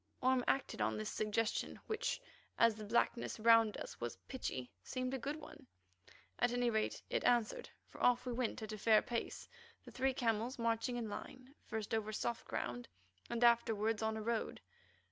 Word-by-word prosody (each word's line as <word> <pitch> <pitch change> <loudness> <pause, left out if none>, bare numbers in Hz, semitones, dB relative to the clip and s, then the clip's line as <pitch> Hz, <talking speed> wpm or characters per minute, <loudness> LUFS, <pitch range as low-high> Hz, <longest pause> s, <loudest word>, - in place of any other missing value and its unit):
Orme 260 -1 +3
acted 270 - 0
on 110 -1 +1
this 110 0 -3
suggestion, 215 +1 -1
which, 440 +2 -1 0.4
as 230 -1 +6
the 215 0 -8
blackness 235 +2 +1
round 225 -1 +6
us - - -7
was 120 0 -3
pitchy, 130 - -4
seemed 255 0 -3
a 265 - -1
good 285 +5 -2
one. 310 -1 -12 0.7
At 245 - +3
any 245 -1 +2
rate 220 -1 -1
it - - +1
answered, 240 -3 +2 0.2
for - - -13
off 245 +1 +4
we 250 - -2
went 235 -2 -2
at 215 - -5
a 215 - -6
fair 215 0 +5
pace, 235 -1 -3 0.4
the - - -10
three 265 0 +1
camels 230 0 0
marching 230 +1 0
in 235 -2 -2
line, 255 +5 -8
first 215 -1 -3
over 215 -1 0
soft 235 +2 -2
ground 120 0 -3 0.4
and 235 0 0
afterwards 225 -2 +3
on 220 0 0
a 215 - -4
road. 230 0 -1
230 Hz, 180 wpm, -37 LUFS, 215-245 Hz, 0.7 s, as